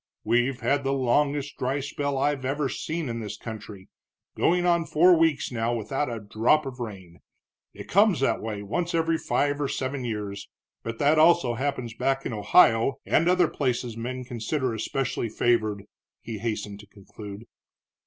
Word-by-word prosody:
"We've 120 +3 +1
had 140 0 +1
the 135 0 0
longest 140 +2 0
dry 130 +3 0
spell 140 0 -3
I've 140 0 0
ever 135 +1 -1
seen 160 +4 -3
in 115 -1 -3
this 105 -2 -6
country 105 -3 -9 0.5
going 175 +1 +2
on 170 -1 +3
four 175 +3 +5
weeks 160 -4 +1
now 120 0 -1
without 135 +5 -2
a 115 -1 -4
drop 110 +8 +2
of 130 -2 -7
rain. 95 -7 -8 0.6
It - - -9
comes 200 -2 +4
that 125 -4 +1
way 105 -2 -4
once 170 - -2
every 165 0 +1
five 145 +1 0
or 145 - 0
seven 130 0 -3
years, 105 -4 -5 0.3
but 115 0 -5
that 150 +4 +3
also 160 -6 +5
happens 125 -2 -3
back 135 +3 -1
in - - -3
Ohio 115 +2 +4
and 165 +3 +3
other 180 -2 +4
places 125 -5 -2
men 125 +2 -5
consider 125 +1 -2
especially 115 +1 -2
favored," 110 -3 +1 0.4
he 110 -2 -6
hastened 105 -2 -4
to 105 - -14
conclude. 100 +1 -11
130 Hz, 165 wpm, -26 LUFS, 110-145 Hz, 0.6 s, four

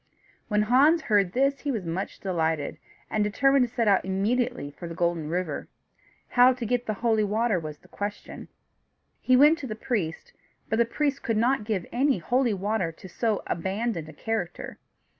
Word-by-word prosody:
When 210 -1 +2
Hans 285 +9 +4
heard 200 -4 +2
this, 275 +1 +2
he 290 - -4
was 215 -8 -3
much 170 +4 -4
delighted, 160 -5 -1 0.3
and 215 - +1
determined 265 +5 +3
to - - -27
set 230 -3 +1
out 195 -2 +4
immediately 205 - -1
for 170 +4 -9
the 165 - -7
Golden 170 -3 -1
River. 170 -3 -3 0.6
How 250 +1 +6
to 245 -2 -5
get 245 +2 -1
the 215 - -1
holy 220 -2 +3
water 215 -1 +1
was 155 -2 -7
the - - -22
question. 205 0 -6 0.7
He 255 - +4
went 300 +5 +6
to 270 - -5
the 215 - -4
priest, 205 -8 -3 0.4
but 220 - +1
the 235 - +5
priest 280 +3 -1
could 225 -2 -1
not 235 0 +2
give 205 -5 -2
any 270 0 +2
holy 240 +6 +1
water 195 -2 -1
to 165 - -13
so 220 +3 -1
abandoned 190 -1 -2
a - - -11
character. 200 -1 -4
215 Hz, 180 wpm, -26 LUFS, 180-245 Hz, 0.7 s, How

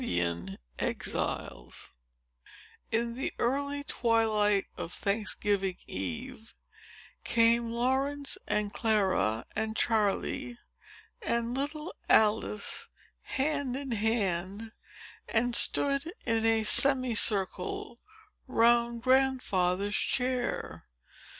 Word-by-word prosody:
Chapter 85 +2 -2 0.2
IX - - -3 1.0
In 235 +1 0
the 255 - -3
early 280 +3 -1
twilight 220 -5 +1
of 165 - -6
Thanksgiving 200 -2 -1
eve, 240 -2 -6 0.7
came 230 0 +3
Laurence, 270 +4 0
and 210 -1 -1
Clara, 190 - +1
and 220 0 -2
Charley, 230 +3 0 0.6
and 235 - -1
little 300 +5 -3 0.2
Alice, 210 -1 +3 0.3
hand 280 -2 -1
in 275 -1 -4
hand, 205 -2 -1 0.6
and 240 +2 +1
stood 280 +6 +3
in 225 -1 +1
a 225 -1 +3
semi 255 +1 +5
circle 200 +2 0 0.5
round 235 -1 +2
Grandfather's 205 -8 +1
chair. 250 -1 -2
230 Hz, 85 wpm, -29 LUFS, 205-255 Hz, 1.0 s, semi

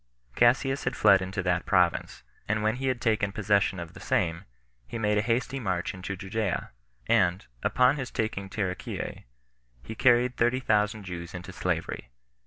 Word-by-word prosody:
Cassius 135 +3 +3
had 125 0 -1
fled 100 -3 +5
into 95 +1 -3
that 90 -1 0
province, - - +1 0.2
and 110 0 0
when 110 +2 +1
he 135 +1 -2
had 130 -2 0
taken 110 -4 +1
possession 100 -2 +1
of 85 -1 -7
the - - -11
same, 85 0 -1 0.4
he - - -5
made 105 -2 +1
a - - +3
hasty 120 +4 -1
march 95 -6 -2
into 95 +1 -5
Judea; 100 0 -3 0.3
and, 95 -5 +2 0.2
upon 125 +3 +3
his 130 -2 -4
taking 100 -3 -3
Taricheae, 95 -3 -4 0.6
he 110 - -7
carried 125 +2 +3
thirty 120 +2 +2
thousand 105 -3 +1
Jews 85 -2 -7
into 90 +2 -8
slavery. 85 -7 -3
105 Hz, 165 wpm, -28 LUFS, 95-120 Hz, 0.6 s, fled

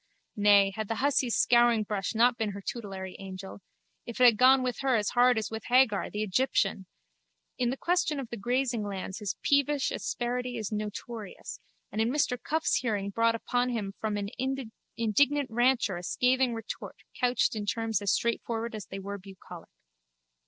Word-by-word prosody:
Nay, 205 -1 +5
had 220 -1 -3
the 225 - -2
hussy's 260 -1 +1
scouringbrush 225 -5 +2
not 240 +2 +4
been 220 -3 -2
her 200 - -7
tutelary 195 -5 -6
angel, 190 0 -8 0.4
it 235 - -8
had 245 -3 +7
gone 255 +3 +5
with 250 -1 -2
her 270 -2 +2
as 210 -2 0
hard 245 -1 +4
as 220 -1 -2
with 220 0 -6
Hagar, 245 -5 +3
the 210 +1 -3
Egyptian! 200 -3 0 0.7
In 245 -1 +1
the 260 - -3
question 340 -3 0
of 265 - -5
the - - -3
grazing 240 +2 -1
lands 195 -1 -5
his 205 -2 -3
peevish 285 0 +2
asperity 245 0 -3
is 215 -2 -4
notorious 210 0 -6 0.3
and 215 - -1
in 225 - +2
Mr 270 -2 +1
Cuffe's 320 +1 0
hearing 205 -5 -2
brought 230 +2 +2
upon 245 +2 -1
him 210 -5 -3
from 215 -1 -2
an 200 -1 -3 0.7
indignant 270 +4 +2
rancher 240 -5 +2
a - - -6
scathing 250 +5 +1
retort 225 0 -7 0.2
couched 250 -2 +2
in 210 -1 -4
terms 225 -2 -1
as 200 -2 +1
straightforward 235 0 -1
as 210 -4 -7
they 195 - -7
were 200 +1 -6
bucolic. 190 -1 -12
230 Hz, 170 wpm, -29 LUFS, 205-250 Hz, 0.7 s, had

